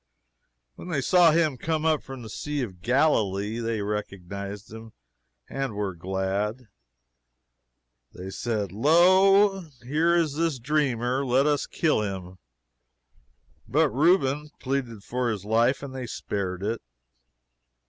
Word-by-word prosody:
When - - -9
they 165 -6 -1
saw 175 +4 +5
him 155 -4 +2
coming 160 -1 -1
up 155 - 0
from 135 -3 -9
the 110 - -9
Sea 150 +2 -3
of 95 -7 -8
Galilee, 110 - +1
they 115 -2 -2
recognized 100 0 -5
him 110 0 -10 0.5
and 135 -5 -4
were 100 -2 -2
glad. 95 +6 -3 1.4
They 95 +1 -8
said, 105 -4 -2
"Lo, 190 - +5 0.2
here 160 +7 +2
is 165 -4 +1
this 165 -3 0
dreamer 130 -1 0
let 130 +1 +2
us 145 -1 +1
kill 155 -9 +1
him." 95 -3 -5 1.3
But 155 +2 +3
Reuben 150 -1 +2
pleaded 125 -6 -3
for 125 +1 -1
his 105 -3 -4
life, 115 +6 +2
and 135 -2 -7
they 130 -2 -5
spared 95 -4 -4
it. 115 +3 -2
125 Hz, 130 wpm, -26 LUFS, 105-150 Hz, 1.4 s, saw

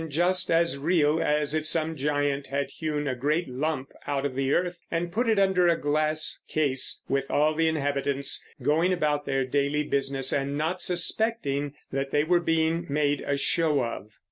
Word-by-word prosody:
just 180 +4 +2
as 165 -3 +2
real 155 0 +2
as 150 0 +1
if 155 0 -1
some 160 0 0
giant 145 -1 -1
had 140 +1 -2
hewn 150 -2 -3
a 130 - 0
great 150 +7 0
lump 135 +1 -3 0.2
out 140 -1 -1
of 140 - -2
the 135 +1 -1
earth 180 +1 0
and 170 +1 -2
put 230 +5 0
it 220 - +3
under 190 -2 +3
a 170 -1 +2
glass 155 +1 0
case, 140 -4 +1
with 135 0 -1
all 155 +2 +2
the 165 +1 +1
inhabitants 140 -2 -1 0.2
going 165 +5 +2
about 150 -4 0
their 135 -1 0
daily 140 +3 0
business 135 -2 0
and 140 +1 -1
not 165 +4 -1
suspecting 175 -6 0 0.2
that 135 0 -2
they 145 +1 +2
were 175 +2 +2
being 165 0 +1
made 145 0 +1
a 140 - -1
show 150 -1 +1
of." 110 -2 -6
150 Hz, 180 wpm, -26 LUFS, 140-165 Hz, 0.2 s, it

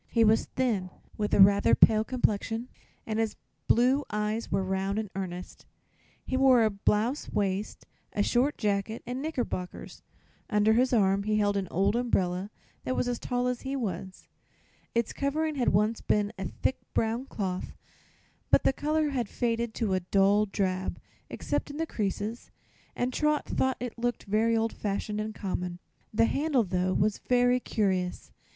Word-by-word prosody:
He 230 - +3
was 220 0 +4
thin, 220 -8 -1 0.3
with 210 -1 -2
a - - +2
rather 200 +1 +6
pale 215 -1 +5
complexion 225 0 -1 0.4
and 220 0 -2
his 225 -1 0 0.3
blue 255 +5 +4
eyes 210 +2 -2
were 195 - +1
round 190 +1 -1
and 215 -3 -3
earnest. 180 -2 -6 0.6
He 260 - -2
wore 260 -3 +5
a 215 - +2
blouse 210 +7 0
waist, 200 0 -2 0.3
a 205 - +1
short 255 +7 +1
jacket 210 +1 -1
and 250 +2 -4
knickerbockers. 250 - -4 0.5
Under 210 0 +3
his 250 +3 +3
arm 200 -4 +3
he 215 +1 0
held 205 -1 +2
an 195 -2 -1
old 195 +4 +1
umbrella 195 -6 0 0.3
that 255 - -2
was - - 0
as 245 -1 -2
tall 245 -1 -1
as 250 -1 -1
he 270 0 -3
was. 190 -6 -5 0.7
Its 235 -1 0
covering 310 +3 -1
had 260 -4 +1
once 210 +3 +1
been 205 0 +1
of 190 -1 -4
thick - - +1 0.2
brown 230 +3 0
cloth, 185 -6 -4 0.8
but - - +5
the - - +3
color 305 +2 0
had 245 -7 -2
faded 235 -1 -1
to 215 -5 0
a 185 - +2
dull 200 +3 +3
drab, 190 -2 -2 0.3
except - - -3
in 290 - -7
the 325 - 0
creases, 215 -2 -3 0.5
and 250 +1 -1
Trot 300 +1 +1
thought 260 -1 0
it 245 -1 -6
looked 240 0 -1
very 225 +3 +2
old 225 0 0
fashioned 210 +1 -3
and 215 0 -5
common. 180 -2 -3 0.3
The 225 +1 +3
handle, 280 0 +1
though, 185 -1 0
was 205 +1 +1
really 245 0 +4
curious. 190 -6 -1
220 Hz, 165 wpm, -28 LUFS, 200-245 Hz, 0.8 s, rather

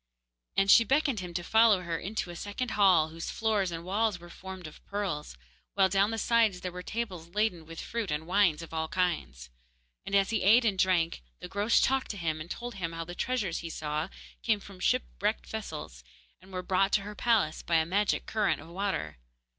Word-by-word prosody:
And 195 0 +5
she 230 - +8
beckoned 275 -1 +2
him 180 -1 -6
to 175 - -1
follow 220 -1 +5
her 170 -1 -2
into 195 -2 -3
a - - -9
second 205 +7 -4
hall 185 -6 +5
whose 165 +1 -6
floors 215 -4 0
and 165 -1 -5
walls 205 0 0
were 175 0 -12
formed 190 0 -9
of 155 - -11
pearls, 185 - -3 0.4
while 195 -1 +4
down 195 +2 +3
the 225 - -3
sides 225 -5 +2
there 180 - -4
were 180 +1 -7
tables 185 -6 -4
laden 185 -7 0
with 165 0 -8
fruit 230 -4 -3
and 150 +1 -2
wines 175 -3 +2
of 165 - -11
all 160 0 -1
kinds; 65 - -2 0.5
and 195 - -2
as 195 +1 +3
he 220 - +1
ate 230 +5 +6
and 200 -4 +1
drank, 175 - +2 0.2
the - - -7
Groac'h 205 +3 +2
talked 265 0 +1
to 205 - -4
him 160 -3 -2
and 160 - -8
told 240 +5 -5
him 170 -5 -4
how 165 0 -4
the 175 - -7
treasures 215 -5 -1
he 170 - -6
saw 155 +2 -3 0.3
came 220 -3 +2
from 195 -2 -13
shipwrecked - - 0
vessels, - - -7 0.4
and 190 +1 -17
were 185 -1 -4
brought 195 +2 +2
to 200 - +4
her 210 +1 -7
palace 210 -8 +1
by 170 - 0
a 160 0 +4
magic 200 +4 +1
current 215 -2 +1
of 160 +3 -12
water. 170 - -3
185 Hz, 210 wpm, -29 LUFS, 165-210 Hz, 0.5 s, she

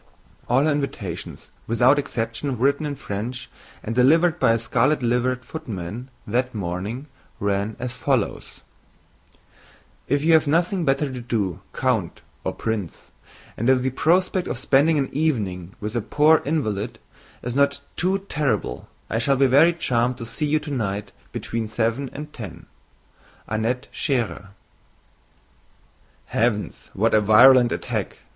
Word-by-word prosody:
All 130 +3 +4
her 155 - +3
invitations 115 - -4 0.2
without 125 +5 +4
exception, 120 +1 -3
written 140 +5 +1
in 145 - -3
French, 120 +1 -5 0.3
and 115 - -3
delivered 160 +8 +4
by 115 - +4
a - - +2
scarlet 125 +5 +1
liveried 125 +1 0
footman 115 - -6 0.2
that 125 +3 -1
morning, 100 +7 -4 0.3
ran 100 +1 -1
as 125 -1 -5
follows: 130 -7 -1 1.5
"If 140 +2 +1
you 165 +1 +4
have 160 -2 +5
nothing 170 +3 +1
better 135 0 +1
to 125 - -5
do, 105 -7 -2
Count 115 -10 -1 0.2
(or - - -1
Prince), 110 -7 -4 0.4
and 115 +4 0
if 130 -1 +4
the 130 - 0
prospect 180 +6 +2
of 120 - -3
spending 145 +4 +3
an 135 -2 +1
evening 105 - -1
with 105 +2 -5
a 120 - +1
poor 150 +8 +4
invalid 115 -8 -1 0.5
is 125 - -3
not 140 +1 +2
too 190 +2 0
terrible, 140 - -1 0.2
I 115 - -1
shall 135 +4 +2
be 135 +1 +4
very 140 +6 +6
charmed 125 -7 0
to 115 - -6
see 120 +6 -3
you 155 +1 +3
tonight 110 -10 -3 0.2
between 115 -1 -3
7 115 +5 -1
and 150 +1 -8
10—Annette 110 - -7
Schérer." 120 -8 -1 1.8
"Heavens! 110 -2 -1
what 110 +4 +2
a 110 - +5
virulent 120 +4 +7
attack!" - - -3
125 Hz, 140 wpm, -23 LUFS, 110-145 Hz, 1.8 s, virulent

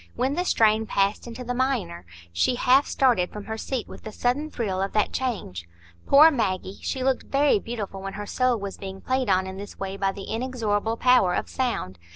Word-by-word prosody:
When 265 +2 0
the 355 +4 -1
strain 220 -6 +3
passed 200 +4 0
into 235 +2 -7
the 245 0 -3
minor, 245 - -2 0.3
she 85 - +2
half 260 +3 +4
started 240 -10 +2
from 210 -1 -8
her 220 - -4
seat 240 +1 -4
with - - -11
the 215 - -8
sudden 255 +8 -1
thrill 200 -9 -2
of 195 - -2
that 210 - +1
change. 185 - -3 0.4
Poor 305 +3 +8
Maggie! 190 - -2
She 260 -2 -3
looked 265 0 0
very 275 -5 +3
beautiful 205 -4 -6
when 195 0 -6
her 205 0 -6
soul 255 +3 +1
was 200 -2 -6
being 190 0 -7
played 260 -3 -1
on 185 0 +3
in 190 0 -7
this 200 +1 -9
way 195 0 -5
by 195 -1 +1
the 195 0 -8
inexorable 225 -2 -2
power 250 -9 +4
of - - -2
sound. 225 - -3
220 Hz, 205 wpm, -25 LUFS, 195-255 Hz, 0.4 s, Poor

